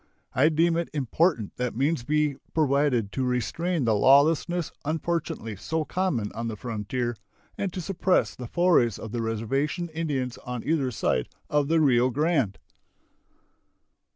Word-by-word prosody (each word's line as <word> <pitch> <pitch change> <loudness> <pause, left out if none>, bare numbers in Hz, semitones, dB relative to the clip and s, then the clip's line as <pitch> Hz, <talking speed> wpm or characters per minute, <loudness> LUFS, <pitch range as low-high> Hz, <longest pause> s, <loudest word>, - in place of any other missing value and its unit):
I 140 +6 +4
deem 165 +1 +2
it 170 - -2
important 145 - 0
that 125 -2 -2
means 140 +3 +1
be 150 +1 +1 0.2
provided 140 -8 +2
to 130 - -2
restrain 140 +6 -1
the 110 - +3
lawlessness 150 - +3
unfortunately 155 -8 -2
so 160 +10 -2
common 150 - -1
on 115 +1 -4
the 110 - -3
frontier 120 +2 -3 0.4
and 195 - -2
to 185 - -5
suppress 185 +1 +1
the 125 - -7
forays 160 - +3
of 110 - -8
the 120 0 -2
reservation 135 +10 -1
Indians 145 -6 -3
on 125 -2 -6
either 150 -4 +1
side 65 - -1 0.2
of 145 -1 +2
the 165 +1 +3
Rio 130 -4 +4
Grande. 140 - +1
140 Hz, 145 wpm, -26 LUFS, 120-165 Hz, 0.4 s, I